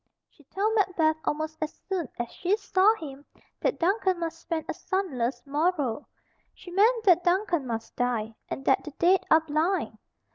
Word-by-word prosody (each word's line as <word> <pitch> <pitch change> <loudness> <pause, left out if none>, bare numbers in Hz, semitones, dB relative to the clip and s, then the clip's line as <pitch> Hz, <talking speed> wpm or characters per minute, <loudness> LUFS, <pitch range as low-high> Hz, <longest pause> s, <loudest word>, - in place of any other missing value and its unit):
She 295 - -23
told 410 +9 -1
Macbeth 360 -7 +2
almost 315 +1 -2
as 310 - -4
soon 370 -7 -2
as 240 -1 -4
she 375 +4 0
saw 405 +1 +3
him 285 -7 -9 0.4
that - - 0
Duncan 375 +1 +1
must 330 -1 -4
spend 330 -2 -3
a - - -2
sunless 275 - -2
morrow. 290 -3 0 0.5
She 355 - -12
meant 445 +5 +3
that 360 -4 +5
Duncan 350 -5 +1
must 225 -1 -5
die, 230 -3 -1 0.2
and 270 - -5
that 265 - +3
the 300 - -8
dead 365 +2 +4
are 315 - +6
blind. 320 +5 -1
330 Hz, 170 wpm, -27 LUFS, 290-380 Hz, 0.5 s, are